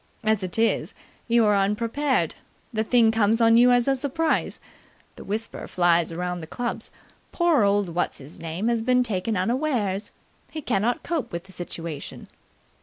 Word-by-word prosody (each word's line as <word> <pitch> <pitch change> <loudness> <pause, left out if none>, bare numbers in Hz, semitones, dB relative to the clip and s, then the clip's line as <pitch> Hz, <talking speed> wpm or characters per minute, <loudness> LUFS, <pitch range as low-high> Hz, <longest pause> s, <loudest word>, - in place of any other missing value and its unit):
As 215 -2 +2
it 185 +1 -3
is, 225 0 +1 0.3
you 235 -1 +4
are 210 -1 +4
unprepared. 230 +8 0 0.4
The 220 0 0
thing 230 -1 +4
comes 225 0 +2
on 230 0 +5
you 245 +2 +6
as 245 0 +3
a 270 - +3
surprise. 295 +4 -1 0.6
The - - -10
whisper 220 +3 -4
flies 170 -2 +2
around 180 +1 -3
the 160 - -8
clubs: 240 +8 -4 0.4
'Poor 340 - +3
old 200 -1 +2
What's 170 +1 -2
his 140 +2 -11
name 165 +6 -3
has 235 -1 +1
been 250 +2 +3
taken 215 -1 -2
unawares. 220 -2 -1 0.4
He 310 -2 -7
cannot 235 0 0
cope 335 -5 -2
with 170 0 -5
the 190 - -16
situation!'" 170 -4 -7
220 Hz, 165 wpm, -24 LUFS, 185-245 Hz, 0.6 s, you